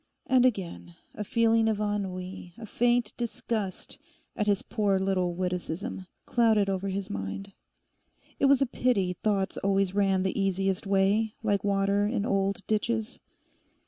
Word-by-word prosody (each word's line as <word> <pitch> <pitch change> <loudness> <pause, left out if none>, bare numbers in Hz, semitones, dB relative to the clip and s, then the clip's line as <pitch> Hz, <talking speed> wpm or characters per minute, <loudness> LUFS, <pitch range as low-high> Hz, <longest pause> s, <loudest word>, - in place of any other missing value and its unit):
And 255 -1 +5
again, 180 -6 -4 0.2
a 210 - -4
feeling 225 +1 +3
of 215 -2 -1
ennui, 190 -4 -4
a 230 - -8
faint 240 +1 +1
disgust 225 -4 -3 0.4
at 210 - -1
his 200 -2 +2
poor 205 -3 +1
little 185 -2 0
witticism, 180 +1 -3 0.2
clouded 220 -5 +3
over 190 +1 -2
his 195 0 -3
mind. 100 - -5 0.9
It - - +3
was 275 0 +5
a - - +2
pity 235 -7 +1
thoughts 200 -3 0
always 195 -1 +1
ran 195 -2 +2
the 190 +1 -1
easiest 195 0 0
way, 200 +3 +2
like 205 -3 +1
water 200 0 +2
in 210 -2 -1
old 195 -1 0
ditches. 220 +1 -1
200 Hz, 145 wpm, -28 LUFS, 190-220 Hz, 0.9 s, And